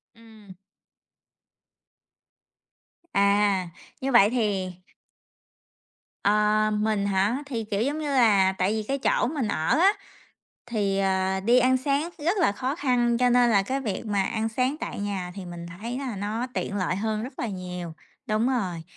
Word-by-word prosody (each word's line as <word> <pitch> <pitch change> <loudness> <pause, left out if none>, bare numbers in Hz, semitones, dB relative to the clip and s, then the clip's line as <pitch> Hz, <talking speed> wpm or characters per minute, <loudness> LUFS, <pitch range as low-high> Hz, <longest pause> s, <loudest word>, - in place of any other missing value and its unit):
Ừm. 220 -4 -15 2.6
À, 200 -2 +2 0.3
như 270 +1 -1
vậy 210 -5 +6
thì 205 -6 -1 1.5
Ờ, 210 +1 +3
mình 210 -1 0
hả? 200 +7 +1
Thì, 240 -5 -4
kiểu, 210 -1 -2
giống 285 +6 -1
như 300 -2 -3
là, 210 -8 +4
tại 190 +2 +1
vì 220 -1 -2
cái 270 +6 -2
chỗ 265 - +1
mình 270 -4 -2
ở 180 - +1
á, 390 +4 +5 0.7
thì, 205 -5 -1
ờ, 190 0 +1
đi 235 +6 +4
ăn 255 +1 +3
sáng 280 +5 -1
rất 340 +7 0
là 345 - +3
khó 255 +7 -3
khăn, 245 -5 +1
cho 250 0 +3
nên 245 0 +4
là 200 -3 +3
cái 265 +7 -2
việc 220 -3 -4
mà 205 -2 +1
ăn 220 +2 -2
sáng 255 +5 0
tại - - -5
nhà 195 -3 -3
thì 195 - -7
mình 175 -1 -8
thấy 220 +8 -6
là 260 -5 -4
nó 215 +5 -3
tiện 200 - -3
lợi 185 -1 0
hơn 215 +2 -2
rất 255 +2 -9
là 240 - -1
nhiều. 180 -4 -6 0.3
Đúng 215 +2 +1
rồi. 185 -10 -2
215 Hz, 165 wpm, -25 LUFS, 195-250 Hz, 2.6 s, vậy